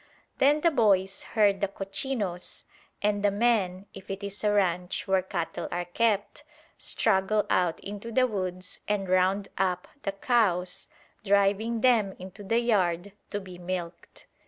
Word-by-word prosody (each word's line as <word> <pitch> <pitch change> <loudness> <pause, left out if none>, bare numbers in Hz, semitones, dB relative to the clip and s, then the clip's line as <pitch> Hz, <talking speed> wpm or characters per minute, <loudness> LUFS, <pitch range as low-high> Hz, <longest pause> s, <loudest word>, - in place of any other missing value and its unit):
Then 290 +3 +4
the 335 - +4
boys 195 -7 +2 0.2
herd 200 -2 +4
the 200 - +2
"cochinos," 195 -1 -4 0.4
and 205 0 +1
the 205 - +5
men, 200 -3 +1
if 190 - -12
it 195 +1 -5
is 200 +1 -5
a 210 - +3
ranch 180 -2 0
where 190 -1 +3
cattle 180 -3 -4
are 175 0 -2
kept, 205 +2 0 0.3
straggle 210 0 +1
out 175 -3 +2
into 205 +3 -7
the 255 +2 +4
woods 185 -5 -4
and 205 -2 -1
"round 185 +2 +2
up" 180 -2 0
the 195 - -2
cows, 195 -5 +1 0.4
driving 205 +3 +2
them 225 -7 +3
into 185 +2 -10
the 225 +4 +1
yard 190 -5 +1 0.2
to 205 - -2
be 185 -2 -11
milked. 175 -1 -6
195 Hz, 150 wpm, -27 LUFS, 185-210 Hz, 0.4 s, the